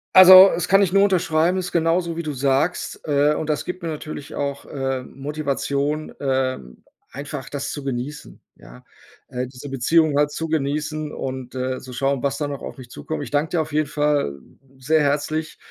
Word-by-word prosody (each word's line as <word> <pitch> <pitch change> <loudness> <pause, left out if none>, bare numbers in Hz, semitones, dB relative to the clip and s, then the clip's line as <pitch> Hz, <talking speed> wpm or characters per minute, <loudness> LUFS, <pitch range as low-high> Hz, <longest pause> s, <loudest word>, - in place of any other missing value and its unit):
Also, 185 +1 +10
es 175 - -2
kann 195 +1 +5
ich 185 -2 -1
nur 195 - +5
unterschreiben, 180 -3 +2
ist 180 -1 -3
genauso 170 0 +1
wie 170 - -3
du 155 -3 -4
sagst, 140 +5 0
äh, 145 0 +3
und 155 0 -4
das 150 - -1
gibt 180 +1 -5
mir 165 - -4
natürlich 150 -2 -7
auch, 140 -1 -3
äh, 135 -2 -3
Motivation, 145 +2 -3
ähm, 130 - -2 0.3
einfach 140 0 -7
das 145 -1 -4
zu 145 - -6
genießen, 135 +2 -5 0.2
ja? - - -15 0.4
Äh, 125 0 -3
diese 130 +2 -10
Beziehung 150 +4 +2
halt 145 +1 +3
zu 160 +2 -4
genießen 150 0 -2
und, 130 -2 -6
äh, 130 0 -2
zu 130 - -11
schauen, 135 +1 0
was 140 0 -1
da 145 - -2
noch 140 -1 -6
auf - - -8
mich 125 -2 -12
zukommt. 155 -2 -5
Ich - - -9
danke 145 +2 +1
dir - - +3
auf 155 -1 -6
jeden 155 -1 +1
Fall 145 - 0 0.4
sehr 155 +5 +2
herzlich, 150 +2 -1
145 Hz, 190 wpm, -22 LUFS, 135-160 Hz, 0.4 s, Also